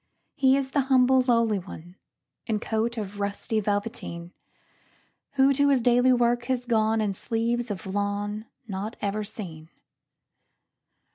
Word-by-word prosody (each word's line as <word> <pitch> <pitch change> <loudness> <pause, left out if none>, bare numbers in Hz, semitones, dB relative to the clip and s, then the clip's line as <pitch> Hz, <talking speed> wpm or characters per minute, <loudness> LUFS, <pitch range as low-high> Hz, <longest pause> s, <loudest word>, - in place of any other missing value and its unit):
He 270 -2 +4
is 270 -1 -2
the 285 - +1
humble, 260 0 +5
lowly 230 -4 +2
one, 175 -1 -11 0.5
In 220 -3 0
coat 225 +2 -1
of 205 -1 -5
rusty 200 +2 -1
velveteen, 205 -4 -3 1.0
Who 275 0 +4
to 285 +1 +3
his 275 -2 +4
daily 245 +2 +4
work 240 -1 +2
has 250 -1 -1
gone; 220 -2 +2
In 205 -2 0
sleeves 230 +4 -2
of 200 -2 -5
lawn 205 +2 -2 0.2
not 205 +2 -4
ever 205 +1 -2
seen. 170 -7 -8
220 Hz, 135 wpm, -26 LUFS, 205-245 Hz, 1.0 s, humble